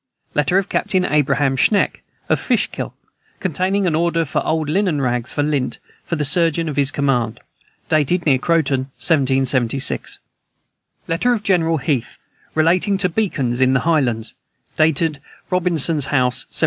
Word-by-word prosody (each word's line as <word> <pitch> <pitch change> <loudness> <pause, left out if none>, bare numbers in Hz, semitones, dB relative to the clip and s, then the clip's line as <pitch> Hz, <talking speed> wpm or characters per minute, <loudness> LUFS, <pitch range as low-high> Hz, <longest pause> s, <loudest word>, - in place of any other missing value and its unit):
Letter 150 +5 +2
of 195 -1 +1
Captain 185 -2 0
Abraham 140 -2 +1
Schenck, 200 +10 +2 0.3
of - - +1
Fishkill, - - -2 0.4
containing 190 +3 0
an 170 - +1
order 165 +1 +1
for 155 - -2
old 160 -1 -1
linen 175 -1 +1
rags, 125 -2 -1
for 145 - -1
lint, 145 -3 -1 0.3
for 170 - -3
the 150 -2 -1
surgeon 165 +1 +1
of 150 - -3
his 140 -1 +2
command. 125 -5 -1 0.5
Dated 155 +3 +1
near 135 -4 +3
Croton, 140 -4 0
1776. 135 -4 +1 0.9
Letter 185 +10 +1
of 220 -3 -3
General 165 -5 +2
Heath 140 -5 -2 0.4
relating 175 +5 +2
to 185 -1 +1
beacons 140 - -1
in 130 0 +4
the 135 - +2
highlands. 125 -9 0 0.4
Dated 155 -1 +1 0.3
Robintson's 165 -5 +1
House, 125 -2 +1
1780. - - -6
155 Hz, 145 wpm, -19 LUFS, 135-170 Hz, 0.9 s, in